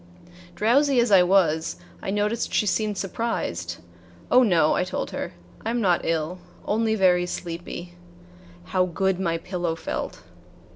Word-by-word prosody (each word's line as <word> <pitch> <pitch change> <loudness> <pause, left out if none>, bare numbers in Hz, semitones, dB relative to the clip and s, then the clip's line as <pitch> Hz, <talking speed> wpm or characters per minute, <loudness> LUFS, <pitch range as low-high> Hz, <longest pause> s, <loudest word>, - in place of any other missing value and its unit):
Drowsy 265 +5 +3
as 235 -2 +2
I 190 -2 +8
was, 170 - +2 0.3
I - - -4
noticed 210 +3 0
she - - +2
seemed 210 0 0
surprised. 180 - -3 0.5
"Oh, 250 - +7
no," 175 -10 +4
I - - +1
told 180 - -4
her; - - -4 0.3
"I 225 - -2
am 240 +1 0
not 180 -6 +2
ill, 165 +2 -1 0.3
only 220 +1 +1
very 180 -3 +3
sleepy." 175 0 -6 0.7
How 185 0 +1
good 190 +1 0
my 170 -3 0
pillow 175 -1 -3
felt! - - -5
185 Hz, 145 wpm, -25 LUFS, 175-215 Hz, 0.7 s, I